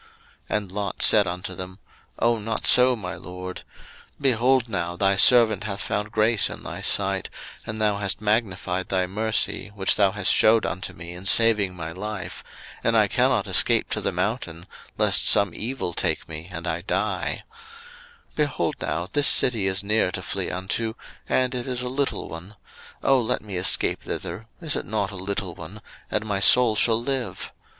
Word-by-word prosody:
01:019:018 - - +1
And 100 -3 -7
Lot 100 -1 -4
said 105 -3 +5
unto 90 +1 -5
them, 90 +2 -9 0.4
Oh, 115 0 +1
not 110 +1 -4
so, 125 0 +6
my 95 -5 -6
LORD: 90 0 -8 0.6
01:019:019 - - -19
Behold 130 -1 +2
now, 85 -5 -3
thy 100 +2 +2
servant 110 0 +5
hath 100 -2 -4
found 105 +1 -3
grace 110 0 +2
in - - -9
thy - - -7
sight, - - +1 0.4
and 110 0 -5
thou 105 -2 +1
hast 100 -1 -1
magnified 95 -4 -1
thy 95 -1 +1
mercy, 110 +3 -1
which 95 -2 +2
thou 100 -2 +4
hast 105 -1 +2
shewed 110 0 +4
unto 95 +1 -4
me 85 0 -9
in 90 +2 -5
saving 105 -4 +5
my 80 -2 -6
life; 105 +3 -6 0.4
and - - +2
I - - +4
cannot - - +1
escape - - +3
to - - -2
the - - -1
mountain, 90 -3 -3 0.3
lest - - +2
some 100 -4 +4
evil 115 -5 -4
take - - -1
me, 80 +2 -8
and 85 -1 -7
I 85 0 -2
die: 95 +1 -2 0.9
01:019:020 - - -31
Behold 150 -2 -1
now, 85 +3 -3
this 145 -1 +4
city 110 -6 +3
is 95 +2 +1
near 105 -2 +1
to - - -5
flee - - -4
unto, 105 +5 -3 0.3
and 130 0 +1
it 125 0 -4
is 125 -1 -2
a - - -3
little 135 +2 -2
one: 90 +5 -10 0.5
Oh, 135 -2 +4
let 110 - -2
me 100 -3 -7
escape 90 +1 +2
thither, 95 +7 -6
(is 160 -3 0
it - - -4
not 105 -3 -2
a - - -9
little 95 -1 -4
one?) 85 +6 -10 0.3
and 105 0 -1
my 100 -2 -2
soul 120 +2 +5
shall 115 +1 +3
live. 130 0 -3
105 Hz, 185 wpm, -24 LUFS, 90-115 Hz, 0.9 s, so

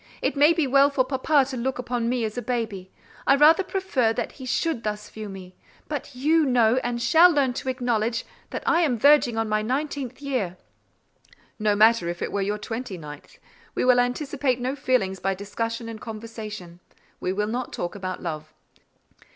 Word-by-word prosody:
It - - -1
may 290 +3 +6
be 330 -3 +1
well 275 +1 +5
for 270 -3 +1
papa 270 +2 +2
to - - -4
look 250 0 -3
on 235 -2 0
me 245 -2 0
as 215 - -5
a 245 - -3
baby: 220 -6 -3 0.4
I 275 - +6
rather 305 +6 +6
prefer 365 - 0
that 240 - -3
he 260 - -10
should 320 -1 0
thus 210 0 -4
view 215 -1 -7
me; 185 -1 -10 0.3
but 285 -3 -5
you 310 +5 +3
know 245 -3 +3
and 245 -2 -1
shall 320 +10 +6
learn 280 -6 +2
to 260 - -4
acknowledge 235 -3 -1 0.2
that - - -5
I 335 - +3
am 280 -8 +1
verging 280 -2 +4
on 225 0 0
my 215 0 +1
nineteenth 265 +1 -3
year." 250 -11 -2 1.0
"No 210 -1 +2
matter 215 -4 +4
if 175 0 -4
it - - -3
were 200 - -1
your 205 +2 -1
twenty 225 -1 -5
ninth; 150 -3 -11 0.4
we - - 0
will 250 -1 +5
anticipate 255 +1 0
no 255 +3 -2
feelings 220 -9 0
by 195 0 -1
discussion 230 +4 -4
and 225 -1 -8
conversation; 215 -5 -8 0.4
we 180 - -2
will 210 +2 -1
not 240 +4 -3
talk 175 - -4
about 185 -2 -5
love." 155 -2 -5
240 Hz, 190 wpm, -25 LUFS, 210-270 Hz, 1.0 s, may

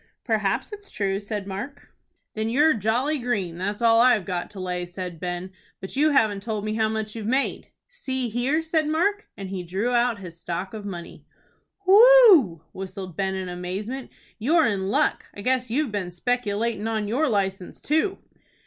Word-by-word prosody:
"Perhaps 220 - 0
it's 410 -1 -10
true," 195 -1 -1
said 205 -1 -5
Mark. 245 +9 -7 0.4
"Then 220 +1 -2
you're 300 +6 +4
jolly 245 +8 0
green, 200 -9 -2
that's 205 +4 -3
all 230 0 +6
I've 240 -6 +4
got 180 -1 -3
to 200 - -10
lay," 180 -1 -3
said 175 -1 -7
Ben. 180 +1 -4 0.3
"But 190 - -7
you 300 +3 +4
haven't 220 -8 +2
told 215 -1 -3
me 215 - -1
how 220 0 +1
much 220 0 -3
you've 220 -2 -5
made." 265 +4 0 0.2
"See 260 - -4
here," 250 +8 0
said 320 -1 +1
Mark, 400 +7 0
and 195 - -6
he 190 -1 -4
drew 190 +8 -2
out 240 -1 +2
his 175 -4 -10
stock 175 +4 -4
of 215 -2 -7
money. 175 -4 -8 0.6
"Whew!" 390 - +7
whistled 185 -2 -7
Ben, 190 +1 -1
in 190 -1 -4
amazement. 190 +9 -5 0.3
"You're 310 +8 +3
in 195 -4 -1
luck. - - +1
I 205 - -7
guess 250 +1 0
you've 270 +1 0
been 200 -4 -3
speculatin' 220 +2 -1
on 220 -2 -1
your 270 +8 +1
license 195 -4 -2
too." 315 +6 0
215 Hz, 175 wpm, -24 LUFS, 190-260 Hz, 0.6 s, Whew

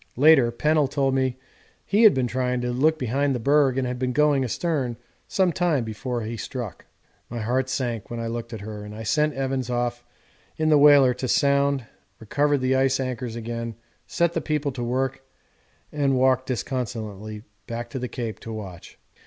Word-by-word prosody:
Later 140 -3 +6
Pennell 150 +4 +2
told 135 -1 0
me 130 -1 0 0.5
he 205 +3 +2
had 220 -3 +7
been 130 -1 +1
trying 125 0 -1
to 125 0 -1
look 155 +6 +2
behind 135 +1 0
the - - -2
berg 140 +1 +3
and 130 - +1
had 125 0 -3
been 125 0 -1
going 145 -1 +3
astern 130 -2 -1 0.3
some 185 -2 +2
time 165 -8 +1
before 120 +2 -4
he 115 +2 -5
struck. 120 -3 -6 0.4
My 120 - -5
heart 125 +4 0
sank 120 -5 -3
when 120 - -5
I 115 - -3
looked 115 0 -4
at 110 -3 -6
her 105 0 -7
and 105 0 -9
I 110 - -7
sent 150 +5 +1
Evans 135 -2 -2
off 120 0 -1 0.5
in 155 0 +1
the 150 - +6
whaler 140 -3 +7
to 130 - -4
sound, 140 0 +2 0.3
recovered 145 +5 +1
the 130 +1 +2
ice 135 0 +2
anchors 125 -3 -3
again, 115 0 -5 0.3
set 170 -1 +1
the 165 - -1
people 150 -1 -1
to 125 -2 -5
work, 130 +2 -1 0.7
and 140 -3 +1
walked 130 0 +2
disconsolately 110 -5 -4 0.2
back 120 0 -5
to 130 - -4
the 125 - -3
Cape 115 -3 -5
to 115 - -8
watch. 100 -6 -8
130 Hz, 185 wpm, -24 LUFS, 120-140 Hz, 0.7 s, had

